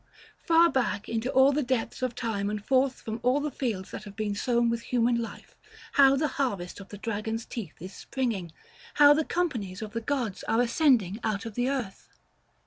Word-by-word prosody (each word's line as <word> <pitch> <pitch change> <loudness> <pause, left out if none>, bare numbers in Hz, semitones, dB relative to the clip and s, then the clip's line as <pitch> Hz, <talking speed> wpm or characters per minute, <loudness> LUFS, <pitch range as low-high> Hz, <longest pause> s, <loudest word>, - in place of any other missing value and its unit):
far 335 0 +5
back 245 -9 -1
into 230 +2 -2
all 265 +1 +6
the 290 +2 +1
depths 250 -2 -2
of 255 -2 -1
time, 210 -5 -2
and 210 0 -4
forth 265 0 +2
from 220 +1 -5
all 250 +4 +2
the 295 0 -2
fields 225 -8 -3
that - - -7
have 205 -1 -11
been 215 -2 -2
sown 235 +2 +1
with 230 0 -1
human 235 0 +1
life, 230 - -9 0.4
how 275 -1 +6
the 305 +3 +1
harvest 200 -10 -2
of 195 - -11
the 205 - -8
dragon's 220 +2 -3
teeth 200 -11 -7
is 185 +4 -8
springing! 225 -11 -3 0.4
how 290 0 +8
the 315 +2 +1
companies 235 - -2
of 215 -1 -7
the 230 - -2
gods 235 -5 -2
are 225 - +1
ascending 235 - +3
out 210 -1 -1
of 225 - -6
the 245 +4 0
earth! 250 -8 -4
235 Hz, 200 wpm, -28 LUFS, 210-265 Hz, 0.4 s, how